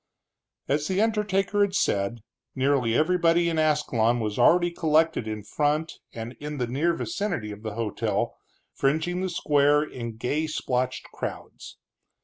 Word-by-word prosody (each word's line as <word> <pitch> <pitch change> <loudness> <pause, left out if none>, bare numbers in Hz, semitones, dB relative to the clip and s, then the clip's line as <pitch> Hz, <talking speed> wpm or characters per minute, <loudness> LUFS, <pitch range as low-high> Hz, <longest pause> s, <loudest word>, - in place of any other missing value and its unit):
As 150 +2 0
the 190 +1 0
undertaker 205 -2 +1
had 200 -1 +2
said, 100 - 0 0.3
nearly 130 -4 +2
everybody 170 +1 +3
in 165 -1 0
Ascalon 130 -7 +2
was 105 -2 -3
already 175 0 +5
collected 160 -6 +1
in 110 -1 -4
front 150 +7 0 0.2
and 115 +1 -7
in 150 0 -5
the 125 - 0
near 150 +8 0
vicinity 170 - -3
of 105 0 -9
the 110 -2 -5
hotel, 110 0 -1 0.4
fringing 160 +6 0
the 190 - -1
square 145 -3 +3
in 115 -6 -7
gay 150 +7 -1
splotched 130 -4 -2
crowds. - - -7
150 Hz, 140 wpm, -26 LUFS, 115-170 Hz, 0.4 s, already